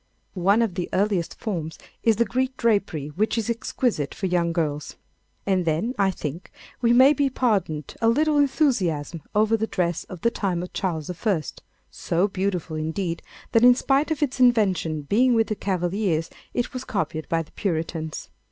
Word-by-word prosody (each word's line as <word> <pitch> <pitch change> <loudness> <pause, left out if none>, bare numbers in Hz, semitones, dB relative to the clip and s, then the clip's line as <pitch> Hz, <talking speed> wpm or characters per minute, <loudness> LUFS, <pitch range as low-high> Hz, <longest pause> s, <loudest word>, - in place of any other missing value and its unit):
One 200 +5 +3
of 220 -5 -1
the 180 -1 -3
earliest 195 -3 0
forms 165 -8 -4 0.2
is 225 -1 +3
the 235 +3 +2
Greek 255 +5 -1
drapery 200 -10 0
which 210 +10 -1
is 225 +1 0
exquisite 230 - -1
for 195 - -4
young 175 -2 +1
girls. 150 -3 -2 0.5
And 190 -2 +2
then, 170 +9 0
I 195 -1 +4
think 165 -1 -6 0.3
we 235 -1 +3
may 260 +4 +7
be 280 -1 +1
pardoned 200 - -1
a 225 - +4
little 300 +4 +3
enthusiasm 190 - +1
over 215 +1 +4
the 220 0 -1
dress 175 -4 -1
of 180 -3 -10
the 235 - +2
time 180 -6 -1
of 180 - -9
Charles 170 -3 -2
I., 180 -2 0 0.5
so 175 +4 0
beautiful 185 -5 -2
indeed, 165 +2 -2 0.3
that 230 - +4
in 245 0 +8
spite 275 +4 +1
of 310 -2 0
its 275 -2 -2
invention 195 - +2
being 240 - +3
with 225 -1 +2
the 215 - 0
Cavaliers 180 -3 -1 0.2
it 245 - -2
was 255 0 -4
copied 160 - -3
by 165 0 +1
the 155 - -22
Puritans. 160 -4 -3
195 Hz, 175 wpm, -24 LUFS, 165-235 Hz, 0.5 s, in